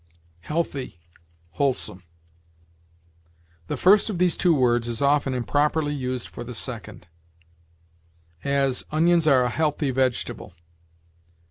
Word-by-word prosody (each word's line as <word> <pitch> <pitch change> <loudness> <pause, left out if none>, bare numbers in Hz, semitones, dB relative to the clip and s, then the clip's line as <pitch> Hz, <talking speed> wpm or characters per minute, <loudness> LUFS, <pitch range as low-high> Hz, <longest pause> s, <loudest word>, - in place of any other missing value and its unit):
HEALTHY 145 - -3 0.5
WHOLESOME. 125 -2 -1 1.7
The - - -3
first 200 +4 +4
of 200 - -3
these 180 -1 +2
two 175 -3 +3
words 120 -3 +2
is 115 -1 -3
often 140 -2 +2
improperly 145 +4 0
used 130 -3 -4
for 120 - -8
the 120 0 -6
second; 110 -6 -4 1.4
as, 140 -2 +1
"Onions 165 +1 +2
are 135 -4 +5
a 125 - 0
healthy 150 -1 0
vegetable." 130 -8 -2
140 Hz, 110 wpm, -24 LUFS, 125-155 Hz, 1.7 s, are